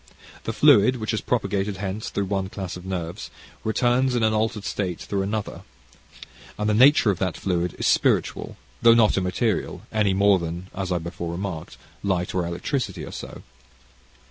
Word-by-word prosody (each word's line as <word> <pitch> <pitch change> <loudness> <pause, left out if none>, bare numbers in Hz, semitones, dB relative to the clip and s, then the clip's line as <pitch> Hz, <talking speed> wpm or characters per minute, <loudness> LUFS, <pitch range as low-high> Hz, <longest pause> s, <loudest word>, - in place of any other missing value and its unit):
The - - -1
fluid, 130 -2 +5
which 110 -2 -3
is 110 - -1
propagated 105 -4 -1
hence 100 +2 -4
through 100 - -2
one 95 -1 -2
class 95 -2 -5
of 90 +1 -9
nerves, 90 -3 -4 0.3
returns 125 +3 +2
in 120 - +1
an 110 0 +3
altered 110 -1 0
state 90 -4 -2
through 100 -1 -2
another, 105 +1 -3 1.0
and 105 - -1
the 105 - +2
nature 125 -1 +6
of 95 - -4
that 95 -2 -1
fluid 90 -2 -1
is - - -3
spiritual, - - +1 0.2
though 115 -1 +7
not 110 -2 +4
immaterial, 95 +3 -1
any 105 -3 +2
more 100 -1 +4
than, 85 +2 -5
as 95 -1 -4
I 90 - +2
before 85 0 -5
remarked, 85 -2 -5 0.2
light 90 -3 -1
or 90 -2 0
electricity 90 - -3
are - - -9
so. - - -8
100 Hz, 170 wpm, -24 LUFS, 90-110 Hz, 1.0 s, though